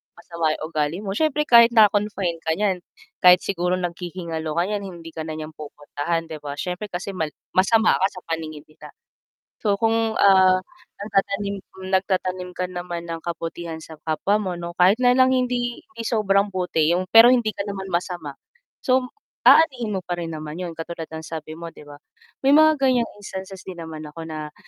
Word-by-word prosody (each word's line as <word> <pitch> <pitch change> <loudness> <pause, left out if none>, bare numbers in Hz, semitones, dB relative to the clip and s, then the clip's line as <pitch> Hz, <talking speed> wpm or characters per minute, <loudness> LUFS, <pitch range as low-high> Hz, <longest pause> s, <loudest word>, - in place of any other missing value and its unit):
masama 170 -1 -3
yung - - -8
ugali 150 +1 -1
mo 195 - -3
siyempre 300 +6 +1
kahit 235 -3 +6
na-confine 205 -5 +3
ka 160 0 -1
niyan, 195 -2 0 0.4
kahit 180 0 +8
siguro 180 -1 0
naghihingalo 170 -3 -4
ka 170 - +2
niyan 205 +2 -2
hindi 170 -3 -9
ka 160 0 -6
na 155 - -4
niya 155 0 -6
pupuntahan 150 +2 -4
'di 155 - -6
ba? 145 -1 -5
Siyempre 180 +5 -4
kasi 180 +2 -5
mal 160 -4 -2 0.2
masama 220 +4 +4
ka - - +5
sa 185 - -10
paningin 155 -2 -4
nila. 155 - -14 0.8
So, 205 - +4
kung, 225 0 +2
ah, 185 -1 +6 0.4
nagtatanim 200 0 -1 0.3
nagtatanim 185 -1 0
ka 180 0 -3
naman 175 -1 -6
ng 165 - -3
kabutihan 165 -1 -5
sa 160 0 -11
kapwa 160 +6 +1
mo, 195 -4 -3
'no, 170 0 -6
kahit 190 +6 +5
na 245 - +5
lang 260 0 +5
hindi 245 +1 -1
hindi 365 -9 -10
sobrang 200 -3 +2
buti 170 -4 +1
'yung 185 +1 -1
pero 225 +1 +9
hindi 235 -3 +2
ka 200 - -4
naman 195 -1 -5
masama, 170 -5 -3 0.5
so, 255 0 +4 0.4
aanihin 255 -9 +5
mo 185 - -3
pa 175 -1 -3
rin 165 - -4
naman 155 0 -6
'yun 170 -2 -6
katulad 165 0 -6
ng 160 0 -7
sabi 155 0 -7
mo, 170 -1 -8
'di - - -14
ba, 145 - -11 0.5
may 275 - +6
mga 310 0 +6
ganyang 255 -4 +2
instances 190 -1 -8
din 185 -2 -8
naman 155 -1 -7
ako 150 +2 -9
na, 155 -1 -6
180 Hz, 185 wpm, -23 LUFS, 165-210 Hz, 0.8 s, pero